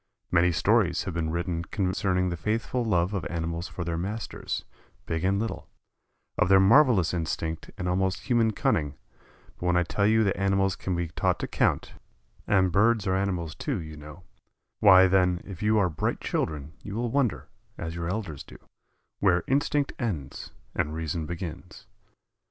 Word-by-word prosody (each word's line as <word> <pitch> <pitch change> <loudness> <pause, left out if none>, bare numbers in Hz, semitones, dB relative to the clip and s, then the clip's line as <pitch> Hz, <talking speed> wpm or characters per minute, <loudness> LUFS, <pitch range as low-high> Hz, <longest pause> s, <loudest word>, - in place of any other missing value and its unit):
Many 90 0 +4
stories 80 - +2
have 95 - -4
been 80 -1 -1
written 85 0 -2
concerning 90 -2 0
the 85 - -2
faithful 110 +7 -1
love 90 -3 +1
of 100 - -2
animals 85 0 -3
for 85 - -6
their 85 -1 -2
masters, 105 +5 -4 0.4
big 80 +1 -2
and 95 +1 +2
little, 100 -9 -4 0.7
of 90 - +3
their 95 0 +7
marvelous 105 - +5
instinct 80 -1 -3
and 90 - -3
almost 95 +1 0
human 120 -3 +2
cunning, 75 -8 0 0.6
but 90 - -2
when 90 0 +3
I 90 - +3
tell 100 +4 0
you 110 +1 +4
that 100 - +1
animals 95 -1 +1
can 95 - -3
be 85 -1 -2
taught 80 - 0
to - - -2
count - - 0 0.5
and 95 -3 +3
birds 105 +3 +3
are 95 -1 +1
animals, 90 -5 -1
too, - - -3
you 80 -2 -8
know 75 +3 -11 0.6
why, 95 -3 +8
then, 90 -1 +3
if 95 -4 -9
you 105 +1 +3
are 100 -3 +4
bright 80 -3 -2
children 75 -1 -3
you 100 - -7
will 120 0 -1
wonder, 135 -3 0 0.3
as 80 0 -5
your 85 0 -3
elders 90 -8 -4
do, - - -13 0.6
where 90 -3 +3
instinct 140 +1 +1
ends 90 - -4 0.2
and 75 +1 -1
reason 80 0 -3
begins. 85 +1 -7
90 Hz, 170 wpm, -27 LUFS, 85-100 Hz, 0.7 s, why